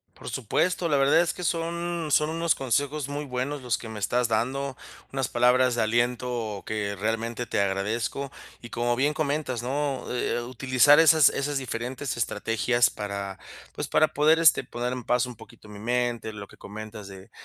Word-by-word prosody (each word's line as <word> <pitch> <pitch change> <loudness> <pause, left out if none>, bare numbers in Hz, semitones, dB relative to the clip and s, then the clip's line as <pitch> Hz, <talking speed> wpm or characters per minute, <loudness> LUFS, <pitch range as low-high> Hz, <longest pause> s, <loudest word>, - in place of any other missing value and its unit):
Por - - -8
supuesto, 170 - 0
la 145 - +3
verdad 140 +4 +5
es 175 - 0
que 180 - -7
son 170 0 -2
son 150 +1 +3
unos 165 -1 +1
consejos 140 +3 -1
muy 145 +1 -4
buenos 130 +2 -3
los 120 -3 0
que 115 - -8
me 110 - -7
estás 120 +5 +1
dando, 130 +5 -1 0.3
unas 135 -2 -1
palabras 125 +1 +3
de 120 - 0
aliento 120 -2 -1
que 105 -2 -2
realmente 115 +3 -2
te - - -1
agradezco 105 +8 -1 0.3
y 120 - -10
como 120 +1 0
bien 145 +5 +1
comentas, 145 -5 -1
¿no? 135 0 -2
Eh, 120 -1 -1
utilizar 130 +4 +4
esas 160 -3 +7
esas 145 +1 -2
diferentes 130 +1 -4
estrategias 115 +1 +1
para 100 -1 -5 0.3
pues - - -4
para 155 - +4
poder, 155 +2 +4
este, 165 -3 +5
poner 120 +1 -3
en 125 -1 -5
paz 125 +2 +2
un 125 -1 -8
poquito 110 0 -15
mi 105 -1 -10
mente, 120 0 -1
lo 100 -2 -8
que - - -18
comentas 105 0 -9
de 95 -1 -12
125 Hz, 180 wpm, -26 LUFS, 115-145 Hz, 0.3 s, esas